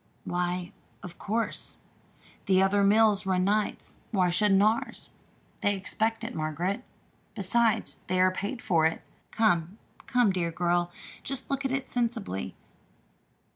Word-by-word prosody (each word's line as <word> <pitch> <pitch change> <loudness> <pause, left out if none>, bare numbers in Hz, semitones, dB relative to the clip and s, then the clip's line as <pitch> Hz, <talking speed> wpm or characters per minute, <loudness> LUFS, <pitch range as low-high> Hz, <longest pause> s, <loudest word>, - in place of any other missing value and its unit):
"Why, 180 0 -2 0.3
of 180 -2 -9
course. 225 +3 -1 0.7
Other 195 +1 +4
mills 210 -1 +4
run 185 -1 +2
nights; 210 +2 -1
why 185 -5 +2
shouldn't 195 +1 +4
ours? 220 +2 0 0.5
They 205 0 +2
expect 220 +3 -1
it, 225 - -4
Margaret. 160 +6 -2 0.5
Besides, 220 +4 +1
they 185 0 0
are 185 0 +5
paid 200 +6 -4
for 165 -5 +3
it. 160 - -4 0.3
Come, 180 -3 +1 0.3
come, 245 -4 +3
dear 175 -3 -1
girl, 175 +1 +1 0.3
just 270 +1 -4
look 275 0 -1
at 265 - 0
it 270 0 -2
sensibly. 230 - -2
195 Hz, 130 wpm, -28 LUFS, 180-225 Hz, 0.7 s, are